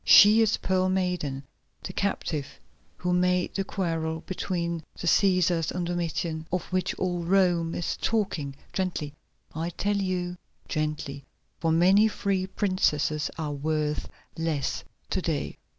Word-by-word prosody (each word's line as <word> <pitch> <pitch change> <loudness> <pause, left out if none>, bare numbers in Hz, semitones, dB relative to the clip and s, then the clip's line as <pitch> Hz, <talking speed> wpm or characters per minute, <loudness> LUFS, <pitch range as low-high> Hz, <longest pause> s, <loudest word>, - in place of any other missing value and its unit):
She 210 +2 +8
is 220 -1 +3
Pearl 185 0 +1
Maiden, 180 -8 -1 0.4
the 185 - -5
captive 150 -8 -2 0.4
who 180 0 0
made 180 0 +2
the 195 - 0
quarrel 165 -4 -2
between 170 -3 -2 0.2
the - - -5
Cæsars 180 -3 +3
and 180 -1 -2
Domitian, 170 -2 -2
of 180 0 0
which 185 0 0
all 180 -1 -1
Rome 175 -2 +2
is 170 - -2
talking. 190 -11 -1 0.2
Gently, 175 -6 -2 0.4
I 165 +2 -2
tell 200 +4 0
you, 180 -2 -1 0.3
gently, 150 -3 -2 0.4
for 165 -1 +1
many 190 +6 +6
free 195 -3 -1
princesses 155 -7 +1
are 155 -3 -2
worth 150 +1 -1 0.3
less 160 -4 -1 0.3
to - - +1
day." - - -2
175 Hz, 135 wpm, -27 LUFS, 160-185 Hz, 0.4 s, She